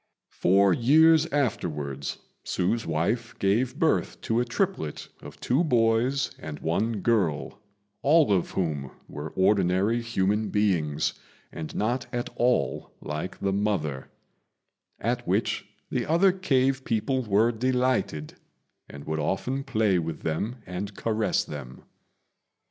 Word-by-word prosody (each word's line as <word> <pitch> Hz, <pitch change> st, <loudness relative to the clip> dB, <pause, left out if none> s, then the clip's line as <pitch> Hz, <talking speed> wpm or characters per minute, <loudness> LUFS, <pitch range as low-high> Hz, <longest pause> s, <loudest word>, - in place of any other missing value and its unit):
Four 95 Hz, +1 st, +4 dB
years 160 Hz, -, +5 dB
afterwards 75 Hz, -, -2 dB, 0.3 s
Hsü's 110 Hz, +4 st, -1 dB
wife 105 Hz, +9 st, -1 dB
gave 120 Hz, +7 st, +1 dB
birth 160 Hz, -, +1 dB
to 115 Hz, -1 st, 0 dB
a 125 Hz, -, +1 dB
triplet 80 Hz, -9 st, -2 dB
of -, -, -11 dB
two 135 Hz, +8 st, +1 dB
boys 120 Hz, -1 st, +2 dB
and 75 Hz, -1 st, -7 dB
one 105 Hz, +6 st, -1 dB
girl, 95 Hz, -11 st, 0 dB, 0.4 s
all 150 Hz, -5 st, +4 dB
of 90 Hz, -3 st, +1 dB
whom 75 Hz, -7 st, -1 dB, 0.2 s
were 75 Hz, +2 st, -6 dB
ordinary 95 Hz, +3 st, +2 dB
human 105 Hz, -2 st, 0 dB
beings, 85 Hz, -8 st, +1 dB, 0.4 s
and 80 Hz, -1 st, -7 dB
not 120 Hz, +5 st, -1 dB
at 120 Hz, -1 st, -3 dB
all 120 Hz, -, +1 dB
like 75 Hz, +4 st, -5 dB
the 100 Hz, -1 st, 0 dB
mother; 95 Hz, -10 st, -1 dB, 0.9 s
at 120 Hz, +2 st, -2 dB
which 100 Hz, +5 st, 0 dB, 0.2 s
the -, -, -1 dB
other 170 Hz, +5 st, +4 dB
cave 135 Hz, -8 st, +1 dB
people 130 Hz, +4 st, 0 dB
were 110 Hz, +1 st, +3 dB
delighted, 125 Hz, -10 st, 0 dB, 0.6 s
and 70 Hz, 0 st, -9 dB
would 80 Hz, 0 st, -2 dB
often 125 Hz, -, -1 dB
play 110 Hz, -9 st, +2 dB
with 80 Hz, -1 st, -4 dB
them 90 Hz, +9 st, -2 dB
and 95 Hz, +3 st, -5 dB
caress 110 Hz, -1 st, 0 dB
them. 70 Hz, -4 st, -9 dB
105 Hz, 125 wpm, -26 LUFS, 85-125 Hz, 0.9 s, years